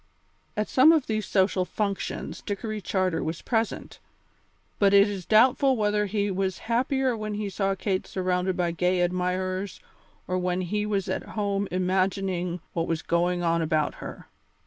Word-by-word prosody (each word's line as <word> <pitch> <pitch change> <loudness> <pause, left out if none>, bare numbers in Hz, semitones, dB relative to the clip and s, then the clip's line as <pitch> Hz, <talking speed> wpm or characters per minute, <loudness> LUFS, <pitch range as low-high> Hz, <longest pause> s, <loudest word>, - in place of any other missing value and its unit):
At 210 - 0
some 270 +5 +6
of 315 -5 +3
these 215 -1 -2
social 190 -1 +2
functions 200 +1 -3
Dickory 210 +1 -4
Charter 185 -3 0
was 160 +1 -4
present, 225 -2 -2 0.8
but 200 -1 +5
it 200 +1 +7
is 195 -4 -5
doubtful 255 +4 +4
whether 210 -1 +1
he 205 0 0
was 190 0 -1
happier 255 +2 +1
when 215 -1 -4
he 205 -1 -3
saw 195 0 0
Kate 190 -1 -2
surrounded 185 0 -1
by 175 -1 +1
gay 180 +2 +1
admirers 185 +2 -1 0.5
or 185 0 0
when 180 0 -1
he 210 +4 -1
was 200 -3 -1
at - - -1 0.2
home 200 -1 0
imagining 185 -1 0
what 165 -1 -1
was 160 -1 -2
going 175 +1 +1
on 165 0 +2
about 155 -1 +1
her. - - -8
195 Hz, 160 wpm, -26 LUFS, 180-210 Hz, 0.8 s, it